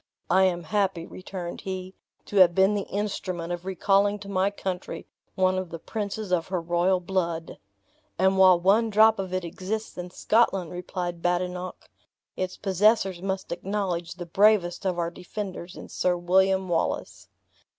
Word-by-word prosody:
"I 190 +1 +5
am 175 -2 0
happy," 190 -1 0
returned 185 -1 -7
he, 185 -1 -5 0.3
"to 205 - -4
have 175 -2 +7
been 190 +2 +4
the 205 -2 -2
instrument 185 -4 -3
of 175 +1 -6
recalling 200 +2 +2
to 200 - -9
my 195 0 +2
country 190 -2 -5 0.3
one 185 0 +2
of 185 -2 -5
the 165 - -6
princes 210 +2 -5
of 165 -2 +1
her 185 -1 -1
royal 175 +2 +1
blood." 170 -3 -2 0.6
"And 190 +1 +3
while 185 -2 +7
one 205 +6 +3
drop 220 0 +5
of 190 -1 -3
it 185 -1 -2
exists 190 +5 -5
in 180 0 -5
Scotland," 195 -3 +1
replied 175 -1 -4
Badenoch, 180 +1 -2 0.5
"its 185 0 -3
possessors 195 -1 +2
must 190 0 -3
acknowledge 180 -2 -2
the 175 -1 -7
bravest 195 0 +3
of 180 -2 -1
our 170 -1 -1
defenders 180 -1 -7
in - - -9
Sir 180 -1 0
William 190 +2 +2
Wallace." 170 -2 -2
185 Hz, 160 wpm, -26 LUFS, 175-195 Hz, 0.6 s, have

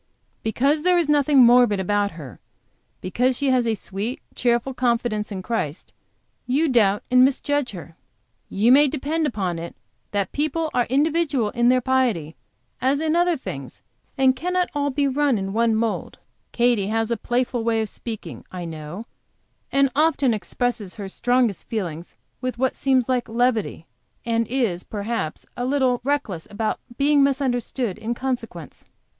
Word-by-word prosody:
Because 275 +7 +1
there 360 +2 +3
is 340 -3 +1
nothing 290 -1 +3
morbid 240 -4 +5
about 205 +1 0
her, 145 -8 -10 0.6
because 250 +7 0
she 280 -2 +1
has 250 -2 +2
a 225 - +1
sweet, 210 +5 -5
cheerful 240 +2 0
confidence 235 -4 0
in 190 -2 -5
Christ; 190 -9 -3 0.5
you 285 +6 +2
doubt 210 -6 +3
and 250 0 +7
misjudge 280 0 +1
her. 170 -3 -10 0.5
You 220 +5 +3
may 290 +3 +7
depend 300 +3 -1
upon 190 -8 -2
it 170 +1 -7 0.3
that 200 -2 -1
people 310 +2 -1
are 245 - +2
individual 285 -4 +1
in 240 0 +2
their 255 0 +4
piety 235 - 0 0.5
as 270 +2 +2
in 315 +1 0
other 345 0 +2
things, 135 - -8 0.3
and 260 -1 +4
cannot 360 +5 -1
all 285 -1 0
be 280 +1 +1
run 275 -2 +2
in 195 0 -3
one 230 0 +2
mould. 225 0 -2 0.3
Katy 235 -5 +2
has 225 +1 -1
a - - +2
playful 240 +1 -1
way 225 -1 +1
of 220 - -1
speaking, 220 +1 -7
I 180 -2 -5
know, 160 +6 -7 0.7
and 275 -1 +3
often 290 -5 +3
expresses 215 0 -3
her 200 -2 -6
strongest 245 -1 0
feelings 175 -7 -5 0.2
with 255 -1 -3
what 260 +1 0
seems 260 -3 +2
like 250 -3 0
levity, 230 -7 0 0.4
and 230 -1 0
is, 225 -8 -1
perhaps, 210 -5 -4
a 245 - -3
little 255 -2 +1
reckless 260 - -2
about 215 +1 -2 0.2
being 285 +1 +4
misunderstood 255 -5 0
in 225 +2 -3
consequence." 235 - -5
240 Hz, 155 wpm, -23 LUFS, 210-270 Hz, 0.7 s, and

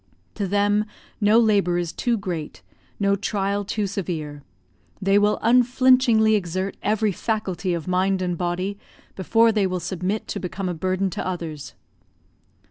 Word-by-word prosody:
To 200 -3 -3
them, 205 +2 +2 0.4
no 210 +2 +5
labour 200 -6 +3
is 175 -1 -2
too 240 -2 0
great, 175 -7 -5 0.4
no 200 -1 +2
trial 200 0 -1
too 205 +1 -2
severe; 165 -7 -4 0.6
they 195 +1 +3
will 210 +1 +2
unflinchingly 245 -1 +4
exert 185 -1 -1
every 215 +1 +1
faculty 190 -3 -2
of 165 0 -6
mind 185 +1 +1
and 180 -1 -1
body, 185 +3 -2 0.4
before 225 +5 +3
they 210 -3 +1
will 185 -1 -2
submit 190 +4 -3
to - - -3
become 185 +1 -4
a 180 - -1
burden 185 +3 -1
to - - -4
others. 165 -5 -5
195 Hz, 145 wpm, -23 LUFS, 180-210 Hz, 0.6 s, no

